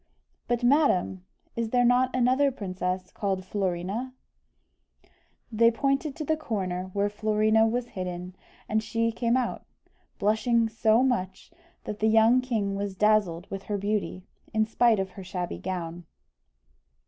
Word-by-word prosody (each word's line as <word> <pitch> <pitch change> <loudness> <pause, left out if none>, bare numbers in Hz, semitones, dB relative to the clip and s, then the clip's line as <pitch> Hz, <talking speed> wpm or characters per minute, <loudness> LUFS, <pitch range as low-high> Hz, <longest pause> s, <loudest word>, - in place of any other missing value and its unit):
"But, 240 0 -1
madam, 240 - +2 0.3
is 230 -1 -2
there 245 +1 +3
not 250 +1 +4
another 255 +3 +3
princess 185 -5 -4
called 190 -2 -2
Florina?" 195 +6 -3 1.4
They 230 +1 +5
pointed 275 +4 -1
to 310 - -5
the 315 - +1
corner 190 -10 -3
where 200 0 +1
Florina 215 +1 +2
was 240 +2 -1
hidden, 180 -1 -6 0.3
and 220 +1 +1
she 230 +1 0
came 235 +1 +1
out, 250 -2 -2 0.5
blushing 225 +3 +2
so 220 +2 +3
much, 190 -8 -2 0.3
that 210 0 -6
the 220 - +2
young 225 +3 +5
king 220 -6 -1
was 200 -1 -3
dazzled 200 -4 +2
with 195 0 -4
her 205 - -2
beauty, 200 -2 -2 0.3
in 220 0 +3
spite 225 -1 +3
of 190 -1 -2
her 190 +1 -10
shabby 180 -1 -4
gown. 175 -2 -5
215 Hz, 140 wpm, -27 LUFS, 190-240 Hz, 1.4 s, They